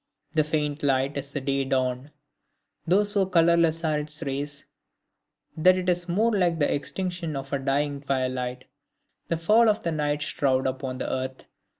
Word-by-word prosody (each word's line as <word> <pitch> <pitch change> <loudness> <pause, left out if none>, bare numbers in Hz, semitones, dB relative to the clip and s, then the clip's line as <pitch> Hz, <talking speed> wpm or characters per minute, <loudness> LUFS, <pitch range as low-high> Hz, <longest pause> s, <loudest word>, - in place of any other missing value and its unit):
This 155 -1 +2
faint 150 -1 -1
light 135 0 +1
is 140 0 -4
the 145 - -2
day 135 0 0
dawn, 130 0 -1 0.8
though 190 +5 +4
so 205 -1 +2
colorless 170 -2 +3
are 155 -2 +1
its 150 +2 -6
rays, 140 0 -3 0.9
that 185 +3 +5
it 185 0 -1
is 175 0 0
more 215 +7 +2
like 180 -5 +2
the 145 - +1
extinction 175 +1 -3
of 135 0 -6
the 140 - 0
dying 140 +1 -1
twilight, 130 -2 -2 0.6
the 165 - 0
fall 215 +7 +4
of 215 +1 0
the 170 - -1
night 150 -1 -1
shroud 130 -3 0
upon 130 0 -3
the 130 - -4
earth. 130 0 -4
150 Hz, 170 wpm, -26 LUFS, 135-170 Hz, 0.9 s, that